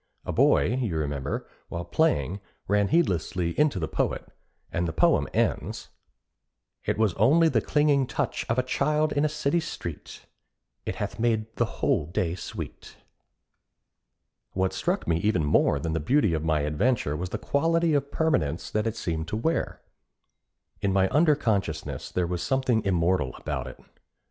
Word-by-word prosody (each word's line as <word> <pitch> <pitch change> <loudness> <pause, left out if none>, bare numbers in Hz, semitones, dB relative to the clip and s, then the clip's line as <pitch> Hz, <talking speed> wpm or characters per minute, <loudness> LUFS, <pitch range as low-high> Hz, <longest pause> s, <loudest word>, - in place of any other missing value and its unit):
A - - -2
boy, 75 - +3
you 100 -10 -1
remember, 70 -2 -3 0.2
while 85 0 -4
playing, 90 - +1 0.3
ran 100 0 +2
heedlessly 90 - +1
into 150 - +2
the 80 -3 -1
poet, - - -2 0.4
and 85 0 -1
the 80 - -3
poem - - +3
ends, - - -1 1.0
It - - 0
was 110 -4 +2
only 155 +10 +5
the - - +2
clinging 145 -3 +2
touch - - -2
Of 115 - +1
a 125 - +3
child 150 +4 +1
in 145 - +1
a 155 - +2
city 155 +2 0
street; 85 - -7 0.6
It - - -2
hath - - -4
made 110 -1 0
the - - +3 0.2
whole 75 - +2
day 85 -1 -1
sweet. 90 - -8 1.6
What 95 0 0
struck - - -1
me 85 -1 +2
even 90 -3 +1
more 75 - +3
than 80 +3 -2
the 80 - 0
beauty 105 - +2
of 80 -1 -1
my 80 -2 +1
adventure 75 - 0
was 90 +3 -4
the - - -3
quality 165 +2 +1
of 140 -1 +1
permanence 85 - 0
that 105 +1 0
it 115 - -2
seemed 80 -1 -3
to 105 - -2
wear. 160 +9 -1 1.0
In 100 - +1
my 95 0 +3
under 150 +1 +4
consciousness, 80 - -2
there 90 - 0
was 85 0 -3
something 130 -4 +1
immortal 85 -7 +1
about - - -4
it. - - -10
100 Hz, 165 wpm, -26 LUFS, -, 1.6 s, only